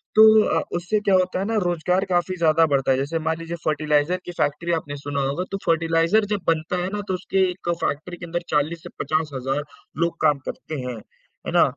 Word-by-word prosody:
तो 220 Hz, 0 st, +8 dB, 0.2 s
अ, -, -, -1 dB, 0.2 s
उससे 180 Hz, +5 st, 0 dB
क्या 200 Hz, -2 st, +2 dB
होता 185 Hz, 0 st, +1 dB
है 195 Hz, -, -1 dB
ना 225 Hz, +2 st, -1 dB
रोजगार 180 Hz, +2 st, +1 dB
काफ़ी 180 Hz, +1 st, +1 dB
ज़्यादा 165 Hz, -1 st, +4 dB
बढ़ता 135 Hz, -2 st, +2 dB
है। 130 Hz, -, +3 dB
जैसे 145 Hz, +5 st, -1 dB
मान 160 Hz, 0 st, -1 dB
लीजिए 165 Hz, +1 st, -5 dB
फर्टिलाइज़र 150 Hz, +2 st, +1 dB
की -, -, -5 dB
फ़ैक्टरी 165 Hz, +4 st, 0 dB
आपने 150 Hz, -3 st, -3 dB
सुना 140 Hz, 0 st, -3 dB
होगा, 145 Hz, +6 st, -2 dB
तो 195 Hz, -, -1 dB
फर्टिलाइज़र 165 Hz, +5 st, +3 dB
जब 200 Hz, -, -5 dB
बनता 165 Hz, +2 st, +1 dB
है 180 Hz, -, -2 dB
ना 210 Hz, -, -2 dB
तो -, -, -1 dB
उसके 190 Hz, 0 st, +1 dB
एक 175 Hz, -1 st, -7 dB
फ़ैक्टरी 175 Hz, +5 st, -2 dB
के 175 Hz, -, -8 dB
अंदर 175 Hz, +1 st, -3 dB
40 155 Hz, +3 st, 0 dB
से -, -, -8 dB
50,000 145 Hz, -3 st, -1 dB, 0.4 s
लोग 170 Hz, 0 st, -1 dB
काम 150 Hz, -3 st, +3 dB
करते 155 Hz, -, -6 dB
हैं। 120 Hz, -3 st, -5 dB, 0.5 s
है -, -, -2 dB
ना? -, -, +6 dB
165 Hz, 215 wpm, -23 LUFS, 150-180 Hz, 0.5 s, तो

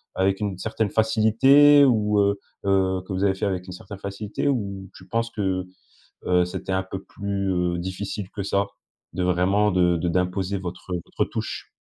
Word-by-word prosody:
avec 95 Hz, +1 st, +1 dB
une 100 Hz, -3 st, -2 dB
certaine 110 Hz, +2 st, -1 dB
facilité 125 Hz, +7 st, +5 dB
ou, 105 Hz, -5 st, +2 dB
heu, 100 Hz, 0 st, +2 dB, 0.3 s
heu, 95 Hz, -1 st, +2 dB
que -, -, -4 dB
vous 95 Hz, +1 st, -1 dB
avez 95 Hz, -1 st, +3 dB
fait 95 Hz, -, -2 dB
avec 95 Hz, -2 st, -2 dB
une 90 Hz, -, -7 dB
certaine 95 Hz, +2 st, -10 dB
facilité 100 Hz, +5 st, -4 dB
ou 100 Hz, -8 st, -2 dB
tu 95 Hz, -, -13 dB
penses 115 Hz, 0 st, -1 dB
que, 110 Hz, -, -4 dB
heu, 95 Hz, -1 st, -1 dB, 0.6 s
heu, 90 Hz, 0 st, +4 dB
c'était 90 Hz, +2 st, -5 dB
un 95 Hz, 0 st, +1 dB
peu 95 Hz, 0 st, -7 dB
plus, 100 Hz, -1 st, -3 dB
heu, 90 Hz, -1 st, 0 dB
difficile 95 Hz, +2 st, -5 dB
que 100 Hz, -, -5 dB
ça? 100 Hz, +1 st, +1 dB, 0.5 s
De 90 Hz, -, -2 dB
vraiment 95 Hz, +4 st, +2 dB
de 90 Hz, -1 st, +3 dB
de 85 Hz, -, -1 dB
d'imposer 90 Hz, +2 st, 0 dB
votre, 90 Hz, 0 st, -6 dB
heu, 90 Hz, -, -2 dB
votre -, -, -1 dB
touche. -, -, -5 dB
95 Hz, 195 wpm, -24 LUFS, 90-105 Hz, 0.6 s, facilité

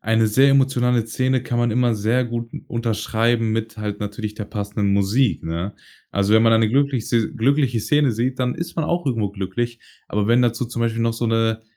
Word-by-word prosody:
eine 110 Hz, 0 st, +2 dB
sehr 135 Hz, +6 st, +4 dB
emotionale 125 Hz, -4 st, +2 dB
Szene 130 Hz, +2 st, 0 dB
kann 120 Hz, -, -2 dB
man 120 Hz, -2 st, +1 dB
immer 120 Hz, -2 st, +2 dB
sehr 115 Hz, +5 st, +1 dB
gut 115 Hz, 0 st, -4 dB, 0.2 s
unterschreiben 115 Hz, 0 st, 0 dB
mit 110 Hz, 0 st, -3 dB
halt 105 Hz, -1 st, -4 dB
natürlich 105 Hz, +1 st, -5 dB
der 105 Hz, -, -4 dB
passenden 100 Hz, -1 st, -2 dB
Musik, 100 Hz, +2 st, +1 dB
ne? 85 Hz, +5 st, -4 dB, 0.4 s
Also, 100 Hz, +1 st, +1 dB
wenn 110 Hz, +1 st, +5 dB
man 115 Hz, -, +5 dB
eine 110 Hz, -1 st, +4 dB
glücklich 135 Hz, -1 st, 0 dB
se 115 Hz, -2 st, +1 dB
glückliche 130 Hz, -1 st, +1 dB
Szene 145 Hz, 0 st, +2 dB
sieht, 125 Hz, +4 st, -2 dB
dann 125 Hz, -1 st, 0 dB
ist 170 Hz, 0 st, -6 dB
man 165 Hz, -, 0 dB
auch 170 Hz, -1 st, -1 dB
irgendwo 110 Hz, -6 st, 0 dB
glücklich. 110 Hz, +5 st, -4 dB, 0.3 s
Aber 105 Hz, +1 st, -1 dB
wenn 120 Hz, +2 st, +4 dB
dazu 120 Hz, 0 st, 0 dB
zum 120 Hz, 0 st, -4 dB
Beispiel 115 Hz, 0 st, -1 dB
noch 115 Hz, -1 st, 0 dB
so 120 Hz, -, -3 dB
'ne 115 Hz, 0 st, 0 dB
115 Hz, 205 wpm, -21 LUFS, 110-125 Hz, 0.4 s, wenn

